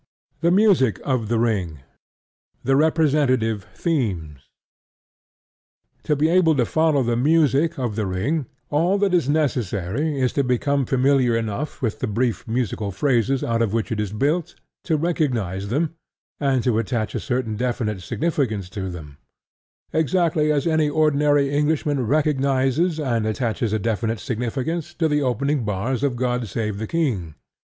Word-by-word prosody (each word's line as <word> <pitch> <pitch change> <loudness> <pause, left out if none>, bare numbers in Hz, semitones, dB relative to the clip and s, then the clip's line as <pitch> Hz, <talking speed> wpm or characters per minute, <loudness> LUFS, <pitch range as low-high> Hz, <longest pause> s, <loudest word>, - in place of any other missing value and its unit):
THE 170 - +2
MUSIC 180 - +3
OF 130 -5 0
THE 115 +1 0
RING 95 - -1 0.8
THE 135 +1 +2
REPRESENTATIVE 140 - +2
THEMES 95 - -2 1.7
To 150 - +2
be 150 +2 +2
able 165 -2 +4
to 125 -3 +2
follow 155 0 +2
the 120 0 0
music 150 +3 +2
of 120 -6 -2
The 105 -2 -1
Ring, 130 - -1 0.2
all 170 +7 +2
that 200 -2 +1
is 170 -6 +2
necessary 135 - -1
is 130 -1 +1
to 140 - +1
become 135 +1 0
familiar 130 -2 +3
enough 115 +7 -4
with 115 -4 -1
the - - -2
brief 115 -1 -1
musical 110 -3 -2
phrases 125 +5 +1
out 115 0 0
of 110 -3 0
which 115 +1 -1
it 110 - -1
is 105 -2 -2
built 150 +10 -1 0.3
to 160 -3 +1
recognize 120 - -1
them 150 +9 -1 0.5
and 135 -4 +1
attach 115 -2 0
a - - -2
certain 125 -4 -2
definite 115 -4 -2
significance 110 - -2
to 95 -3 -4
them, 75 -5 -9 0.7
exactly 160 -1 +2
as 145 -2 0
any 160 -2 +2
ordinary 145 -2 +2
Englishman 145 -3 0
recognizes 140 +3 +1
and 120 -7 0
attaches 110 0 -1
a 110 - +1
definite 115 +1 -1
significance 135 - -3
to 165 - +1
the 150 -1 +1
opening 135 +2 0
bars 105 +5 -2
of 140 -3 0
God 125 -1 -1
Save 105 -1 -3
the 110 - -4
King. 105 - -1
130 Hz, 150 wpm, -22 LUFS, 110-150 Hz, 1.7 s, able